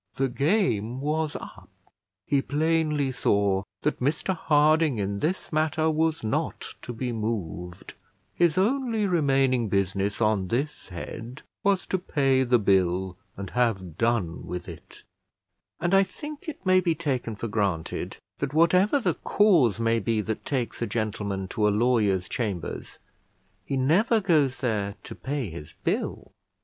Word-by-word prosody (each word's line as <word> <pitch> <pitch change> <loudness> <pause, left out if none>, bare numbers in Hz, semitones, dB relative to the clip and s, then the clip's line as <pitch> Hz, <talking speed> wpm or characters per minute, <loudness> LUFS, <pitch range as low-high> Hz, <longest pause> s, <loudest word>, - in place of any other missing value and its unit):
The 135 0 +1
game 130 - +1
was 155 +2 -1
up; - - -9 0.6
he 140 -1 +2
plainly 150 -1 +1
saw 100 -5 +2 0.2
that 150 - 0
Mr 150 +8 0
Harding 155 -3 +3
in 100 0 -2
this 170 - -2
matter 155 +1 +2
was 160 -1 0
not 110 - -2 0.2
to - - -6
be 120 +1 -3
moved; 95 -5 -4 0.4
his 170 -2 +2
only 230 +1 +1
remaining 135 - +2
business 100 +1 0
on 105 -4 +2
this 140 +8 -2
head 115 - -8 0.2
was 195 -1 +2
to 190 - -1
pay 135 -6 +2
the 125 -1 +4
bill 95 -3 +1 0.2
and 100 0 -6
have 100 -9 0
done 115 -8 0
with 90 0 -5
it; - - -12 0.8
and 175 +3 0
I 195 - +7
think 295 - -6
it 285 - -9
may 185 0 +5
be 170 -3 +1
taken 135 -8 -2
for 115 - -4
granted, 100 -7 -2 0.2
that 140 +1 -3
whatever 180 - +4
the 245 - +1
cause 160 - +3
may 115 0 +2
be 110 +1 0
that 110 0 -4
takes 125 -5 -2
a 120 - 0
gentleman 105 -3 -2
to 105 0 +1
a - - +4
lawyer's 105 -4 +2
chambers, 100 - -4 0.7
he 135 - -1
never 185 - +3
goes 155 -9 +2
there 105 -5 -1
to - - -8
pay 135 - -4
his 80 -2 -9
bill. - - -2
130 Hz, 150 wpm, -26 LUFS, 105-160 Hz, 0.8 s, I